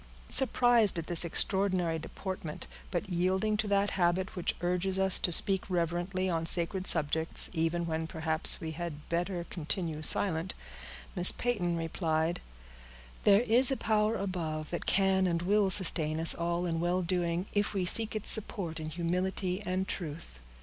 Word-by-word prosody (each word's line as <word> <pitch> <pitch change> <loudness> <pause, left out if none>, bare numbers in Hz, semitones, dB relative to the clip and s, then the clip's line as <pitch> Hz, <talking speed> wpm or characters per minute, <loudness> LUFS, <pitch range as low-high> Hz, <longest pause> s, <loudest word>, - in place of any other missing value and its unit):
'" - - -23
Surprised 240 -6 +4
at 165 - -4
this 175 -1 +5
extraordinary 180 -1 +2
deportment, 165 -1 -7 0.2
but 180 +2 -3
yielding 190 +4 0
to 210 0 -2
that 200 0 +1
habit 185 +1 -1
which 180 - -2
urges 180 +2 -1
us 190 -1 +4
to 175 - -1
speak 190 +3 +1
reverently 175 +2 -2
on 165 -3 -1
sacred 175 +3 0
subjects, 160 0 +1
even 165 +1 -1
when 160 -1 -3
perhaps 160 0 0
we 160 - -6
had 160 -2 -7
better 175 +1 -2
continue 165 -1 -5
silent, 165 +1 0 0.6
Miss 180 -1 +8
Peyton 185 -9 -2
replied,— 165 0 -2 0.8
"There 205 +1 +5
is 245 +2 +4
a 270 - -1
Power 215 0 0
above, 165 -6 -4
that 175 - -5
can 190 -1 +2
and 170 -1 -2
will 200 +1 +2
sustain 160 -5 +3
us 165 - +6
all 170 +1 -2
in 165 -2 -2
well 175 +2 -1
doing, 175 0 -2
if 205 0 -1
we 185 -2 -1
seek 220 +5 +2
its 215 - +2
support 195 -7 -3
in 155 0 -6
humility 180 +3 -3
and 185 0 -3
truth." 155 - -7
180 Hz, 160 wpm, -30 LUFS, 165-195 Hz, 0.8 s, Miss